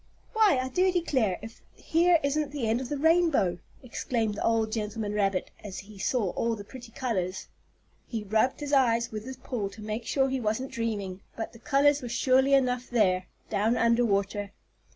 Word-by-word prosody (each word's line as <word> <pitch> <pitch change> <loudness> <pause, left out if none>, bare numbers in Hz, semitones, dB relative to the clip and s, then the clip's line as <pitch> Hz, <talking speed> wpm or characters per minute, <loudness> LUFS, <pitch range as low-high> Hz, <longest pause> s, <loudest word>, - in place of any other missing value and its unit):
"Why, 430 -9 +4
I 255 0 -1
do 370 +7 +2
declare, 260 - +1
if 225 0 -10
here 340 +1 +3
isn't 285 0 0
the 280 -6 -2
end 225 +3 +1
of 255 - -6
the 290 - -2
rainbow!" 315 - +3 0.2
exclaimed 230 -3 -2
the 205 - -4
old 225 -1 +1
gentleman 215 -1 -3
rabbit, 195 -3 0
as 195 -3 -7
he 200 0 -10
saw 210 -3 0
all 230 0 -1
the 205 - -8
pretty 245 +2 -11
colors. 190 -8 -3 0.6
He 225 -3 -4
rubbed 220 +8 +1
his 290 0 -4
eyes 235 -4 +3
with 215 0 -6
his 260 0 -7
paw, 225 -6 -4
to 200 +2 -12
make 215 +2 -4
sure 270 -1 +2
he 265 0 -1
wasn't 230 +4 -2
dreaming, 205 -6 -3
but 225 - -5
the 230 - -14
colors 285 +3 +3
were 245 - -6
surely 265 +3 +3
enough 250 -2 +1
there, 185 -6 +2 0.2
down 220 +4 +2
under 230 +1 +3
water. 200 -1 0
230 Hz, 190 wpm, -28 LUFS, 210-265 Hz, 0.6 s, Why